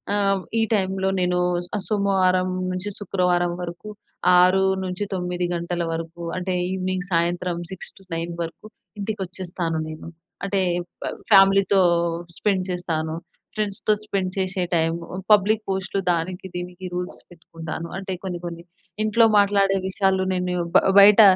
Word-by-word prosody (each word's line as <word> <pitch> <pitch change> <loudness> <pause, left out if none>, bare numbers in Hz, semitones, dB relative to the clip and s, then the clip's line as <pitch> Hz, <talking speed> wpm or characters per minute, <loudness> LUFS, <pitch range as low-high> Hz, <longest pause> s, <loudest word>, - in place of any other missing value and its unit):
ఆహ్, 195 -1 +2 0.2
ఈ - - +4
టైమ్‌లో 190 -1 0
నేను 180 0 +1 0.4
ఆహ్, 200 - -4
సోమవారం 190 -3 +2 0.2
నుంచి 185 +3 -3
శుక్రవారం 180 -3 +1
వరకు 175 +5 -7 0.5
6-9 185 -1 +1
గంటల 170 0 -2
వరకు 165 +1 -6 0.2
అంటే 185 0 -2 0.2
ఇవెనింగ్, 185 -1 -2
సాయంత్రం 175 +1 0 0.2
6-9 175 -2 -6
వరకు 165 +5 -9 0.4
ఇంటికొచ్చేస్తాను 185 -5 -3
నేను. 155 +1 -8 0.4
అంటే 195 -1 +1 0.4
ఫ - - -6 0.3
ఫ్యామిలీతో 195 0 +6 0.6
స్పెండ్ 195 -3 +1
చేస్తాను. 160 -3 -2 0.4
ఫ్రెండ్స్‌‌తో 210 0 0
స్పెండ్ 195 -3 -2
చేశే 185 0 0
టైమ్ 165 0 +2 0.3
పబ్లిక్ 210 +1 +5
పోస్ట్‌లు 190 0 -1
దానికి 180 +2 -1
దీనికి 180 +1 -6
రూల్స్ 180 0 -4
పెట్టుకుంటాను. 165 -1 -7
అంటే 190 0 -4
కొన్ని 180 -2 -4
కొన్ని 170 0 -6 0.4
ఇంట్లో 215 +2 +4
మాట్లాడే 200 -1 +3
విషయాలు 190 0 +1
నేను 180 0 -1 0.2
బ - - +11 0.2
బయట 205 +2 +9
185 Hz, 120 wpm, -23 LUFS, 175-195 Hz, 0.6 s, బ